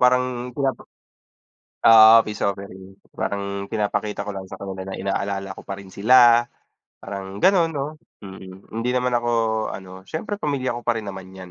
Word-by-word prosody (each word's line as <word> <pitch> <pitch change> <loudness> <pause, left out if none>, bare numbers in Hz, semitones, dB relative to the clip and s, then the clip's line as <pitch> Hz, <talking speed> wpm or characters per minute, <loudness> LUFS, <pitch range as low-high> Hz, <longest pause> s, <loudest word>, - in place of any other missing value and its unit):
parang 125 0 +2
pinapa 135 -2 -1 1.1
oo 110 0 +9
peace 105 0 -5
offering. 95 -1 -6 0.2
Parang 100 0 -3
pinapakita 105 -1 -2
ko - - -3
lang 95 -1 -7
sa - - -8
kanila 95 -1 -6
na 95 - -6
inaalala 100 0 -3
ko - - -9
pa 100 - -4
rin 100 -1 -12
sila, 120 +3 +6 0.6
parang 100 0 -7
ganun 180 -4 +4
'no? 140 -1 -2 0.4
Mm, 95 -1 -11
hindi 115 +3 -2
naman 125 0 +1
ako 120 0 -3 0.5
ano 95 -1 -9 0.2
siyempre 205 +5 -4
pamilya 140 -7 -1
ko - - -11
pa 120 - +2
rin 110 - -7
naman 95 -1 -8
'yan, 95 -1 -10
105 Hz, 165 wpm, -22 LUFS, 95-125 Hz, 1.1 s, oo